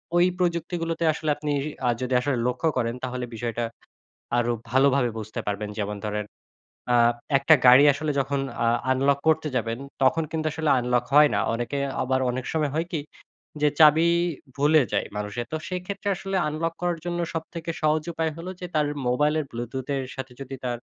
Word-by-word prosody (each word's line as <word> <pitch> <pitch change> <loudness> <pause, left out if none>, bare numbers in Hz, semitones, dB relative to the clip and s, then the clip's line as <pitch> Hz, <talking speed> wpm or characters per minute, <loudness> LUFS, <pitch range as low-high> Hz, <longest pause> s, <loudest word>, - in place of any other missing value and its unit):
ঐ - - +5 0.2
প্রযুক্তিগুলোতে 170 -1 -1
আসলে 155 0 -3
আপনি 150 0 -3 0.4
আ - - +4
যদি 130 0 -2
আসলে 140 -2 0
লক্ষ্য 145 +6 0
করেন 115 -1 0
তাহলে 125 -1 -3
বিষয়টা 120 +1 -3 0.7
আরো 120 0 +2 0.2
ভালোভাবে 135 -1 +3
বুঝতে 110 0 -6
পারবেন। 105 +1 -2
যেমন 105 0 -2
ধরেন 105 0 -2 0.7
আ - - +6 0.4
একটা 140 +4 +6
গাড়ি 125 +3 +9
আসলে 150 +2 -2
যখন 135 +1 -1 0.2
আ - - +3 0.3
আনলক 135 +2 +2
করতে 160 -1 +2
যাবেন 115 -1 -1 0.2
তখন 155 +5 +3
কিন্তু 160 -1 -1
আসলে 160 -1 0
আনলক 125 0 +1
হয় 150 0 +8
না। 100 - +2
অনেকে 120 +4 -3 0.2
আবার 130 0 +1
অনেক 125 +1 -4
সময় 155 -3 0
হয় 165 +1 0
কি? 160 - -1 0.6
যে 150 - +6
চাবি 155 +2 +7 0.5
ভুলে 150 +2 +4
যায় - - 0
মানুষের। 105 +3 -4
তো - - 0
সেক্ষেত্রে 190 +3 -4
আসলে 195 +1 -3
আনলক 160 +2 -2
করার 175 -2 0
জন্য 175 0 -2 0.2
সবথেকে 165 +1 -5
সহজ 155 0 +2
উপায় 160 0 -1
হল 165 - -8
যে 180 - -4
তার 150 -1 +2 0.2
মোবাইলের 150 +5 +2
ব্লুটুথের 130 +3 -3
সাথে 135 -1 -6
যদি 135 0 -6
তার 120 -1 -2
140 Hz, 170 wpm, -25 LUFS, 125-160 Hz, 0.7 s, গাড়ি